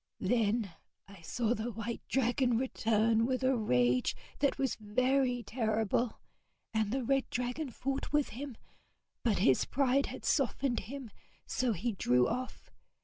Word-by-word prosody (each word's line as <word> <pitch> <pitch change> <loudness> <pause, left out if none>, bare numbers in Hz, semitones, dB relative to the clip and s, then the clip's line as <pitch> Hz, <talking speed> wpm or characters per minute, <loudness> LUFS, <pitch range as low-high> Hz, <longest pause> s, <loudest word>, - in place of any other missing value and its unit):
Then 220 -4 +1 0.3
I 195 -3 -14
saw 230 +7 0
the 240 +1 -3
white 225 +2 -4
dragon 245 -1 +2
return 225 -2 +2
with 260 0 -1
a 260 0 +3
rage 125 - +2 0.2
that 280 -1 +2
was 270 -2 0
very 250 +3 +1
terrible, 225 0 0 0.5
and 220 -2 +1
the 265 +1 -1
red 270 +2 +1
dragon 250 +4 -2
fought 270 +3 -3
with 295 -1 +2
him; 260 0 -7 0.6
but 225 -4 +1
his 135 -8 +4
pride 275 0 +2
had - - -8
softened 270 -2 +1
him, 265 -5 -7 0.3
so 250 -3 0
he 220 +6 -1
drew 125 - +2
off. 255 0 -5
240 Hz, 145 wpm, -32 LUFS, 215-260 Hz, 0.6 s, his